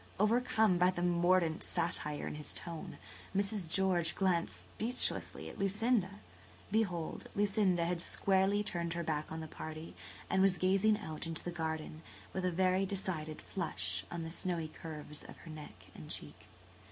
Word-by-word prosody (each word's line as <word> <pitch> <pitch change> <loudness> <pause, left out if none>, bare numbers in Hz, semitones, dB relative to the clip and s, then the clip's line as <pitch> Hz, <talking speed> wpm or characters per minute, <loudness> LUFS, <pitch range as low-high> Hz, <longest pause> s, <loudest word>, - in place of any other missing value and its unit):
Overcome 220 -3 +4
by 180 +1 +6
the 175 -1 -2
mordant 175 -1 +3
satire 150 -3 -1
in - - -3
his 150 0 -2
tone, 170 -2 -6 0.4
Mrs. 200 -3 0
George 180 -2 +3
glanced 180 -3 +1
speechlessly 245 +3 +1
at - - -9
Lucinda. 200 0 +1 0.5
Behold, 185 -7 0
Lucinda 195 -4 +3
had 170 0 -1
squarely 195 +2 +2
turned 170 -4 -2
her 170 0 -2
back 155 -1 -2
on 160 0 -4
the 160 - -5
party 155 +1 -7 0.3
and 190 - +2
was 190 -1 +4
gazing 195 +4 +4
out 160 -6 -5
into 165 -1 -4
the 175 - -3
garden, 160 -2 -3 0.3
with 190 -1 -1
a 180 - +2
very 185 +2 +3
decided 185 -6 -3
flush 95 - -1
on 170 -1 -4
the 165 - -5
snowy 170 -2 0
curves 150 -2 -8
of - - -11
her 165 - -10
neck 95 -12 -11
and 75 - -10
cheek. - - -4
175 Hz, 160 wpm, -35 LUFS, 160-195 Hz, 0.5 s, by